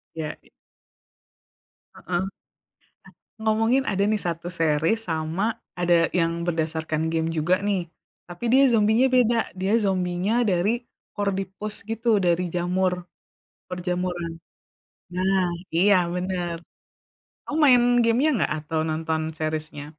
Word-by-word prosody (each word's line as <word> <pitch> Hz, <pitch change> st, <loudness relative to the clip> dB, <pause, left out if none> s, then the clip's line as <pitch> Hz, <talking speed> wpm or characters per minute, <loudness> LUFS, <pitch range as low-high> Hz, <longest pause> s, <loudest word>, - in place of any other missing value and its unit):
Iya, 155 Hz, -2 st, -4 dB
i -, -, -24 dB, 1.5 s
Heeh. 180 Hz, +2 st, -2 dB, 1.1 s
Ngomongin 225 Hz, +4 st, +2 dB
ada 195 Hz, 0 st, +1 dB
nih 215 Hz, -1 st, +1 dB
1 170 Hz, 0 st, -3 dB
series 160 Hz, +7 st, +2 dB
sama 160 Hz, +3 st, -2 dB, 0.4 s
ada 175 Hz, 0 st, +3 dB, 0.3 s
yang 165 Hz, 0 st, 0 dB
berdasarkan 160 Hz, -1 st, -1 dB
game 160 Hz, 0 st, 0 dB
juga 170 Hz, +4 st, +3 dB
nih. 185 Hz, -4 st, 0 dB, 0.4 s
Tapi 175 Hz, +4 st, -10 dB
dia 265 Hz, +2 st, +6 dB
zombie-nya 220 Hz, +4 st, +4 dB
beda, 240 Hz, -2 st, +4 dB, 0.2 s
dia 195 Hz, +3 st, 0 dB
zombie-nya 185 Hz, +2 st, 0 dB
dari 180 Hz, +4 st, +2 dB, 0.4 s
Cordyceps 200 Hz, +1 st, -3 dB
gitu 225 Hz, +2 st, -4 dB, 0.2 s
dari 175 Hz, +1 st, +2 dB
jamur, 180 Hz, +1 st, +1 dB, 0.8 s
perjamuran. 180 Hz, -1 st, -3 dB, 0.8 s
Nah 190 Hz, +1 st, +2 dB, 0.3 s
iya 200 Hz, +4 st, +5 dB, 0.2 s
bener, 180 Hz, -2 st, -2 dB, 0.9 s
kamu 295 Hz, -, -4 dB
main 250 Hz, -4 st, +6 dB, 0.2 s
game-nya 235 Hz, +6 st, +3 dB
nggak -, -, 0 dB
atau 155 Hz, +1 st, -3 dB
nonton 160 Hz, 0 st, -1 dB, 0.2 s
series-nya? 155 Hz, -2 st, -4 dB
180 Hz, 110 wpm, -24 LUFS, 165-205 Hz, 1.5 s, dia